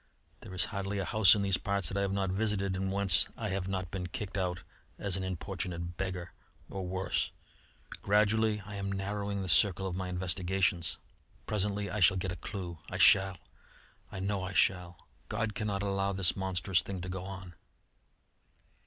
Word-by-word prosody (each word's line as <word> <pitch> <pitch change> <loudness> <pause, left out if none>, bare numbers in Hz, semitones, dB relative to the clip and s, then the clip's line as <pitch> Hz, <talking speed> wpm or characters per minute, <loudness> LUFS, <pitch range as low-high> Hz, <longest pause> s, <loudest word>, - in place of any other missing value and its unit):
There 95 - -9
is 95 +2 +4
hardly 100 0 -2
a 95 - -1
house 110 0 +6
in 100 - 0
these 95 -2 +2
parts 100 -4 0
that 95 - -3
I - - +1
have 100 -1 0
not 100 -1 0
visited 100 -1 0
and 95 +1 -2
whence 100 0 +5
I 110 -2 -3
have 95 -1 -2
not 95 -3 -3
been 90 -2 -3
kicked 95 +3 -5
out 90 -2 -2 0.3
as 100 -3 0
an 95 - -2
importunate 90 -2 -4
beggar 90 -2 -4 0.4
or 95 -2 -4
worse. 95 +1 -1 0.7
Gradually 105 +1 +2
I 105 0 -7
am 100 0 -3
narrowing 100 0 -2
the - - -4
circle 95 +1 +5
of 95 -2 -3
my 95 0 -3
investigations. 90 -1 0 0.5
Presently 100 -1 -1
I 105 - -2
shall 95 0 +5
get 95 0 -2
a - - -4
clue. 90 -2 -6
I - - -4
shall! 95 -1 +6 0.7
I 95 - -6
know 100 0 -1
I 95 +2 -4
shall! 90 -2 +1 0.2
God 105 0 -1
cannot 100 -1 -2
allow 100 0 0
this 95 -2 +2
monstrous 95 -1 +1
thing 95 -2 -6
to 90 - -6
go 90 0 -4
on!" 95 -2 -8
95 Hz, 180 wpm, -31 LUFS, 90-100 Hz, 0.7 s, house